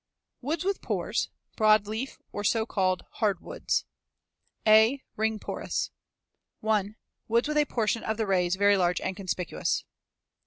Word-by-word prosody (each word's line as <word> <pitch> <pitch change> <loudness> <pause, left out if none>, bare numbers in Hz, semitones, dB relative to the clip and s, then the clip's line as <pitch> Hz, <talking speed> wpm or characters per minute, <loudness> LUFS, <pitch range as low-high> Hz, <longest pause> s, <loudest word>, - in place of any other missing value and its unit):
II. 255 - -10
WOODS 315 +2 0
WITH 395 0 0
PORES - - -1 0.3
BROADLEAF, 215 +3 +2
OR 205 - -4
SO 220 +1 +2
CALLED 185 -4 0
"HARDWOODS" 215 - 0 0.8
A. 220 +5 +6
Ring 220 0 0
porous. - - -3 0.7
1. 215 -1 +1 0.3
Woods 235 +4 +2
with 300 0 0
a 300 - +4
portion 230 -3 0
of 220 0 -1
the 220 - 0
rays 180 -2 +2
very 200 +1 +4
large 180 -1 +2
and 190 - -3
conspicuous. 185 -2 -2
215 Hz, 140 wpm, -28 LUFS, 195-230 Hz, 0.8 s, A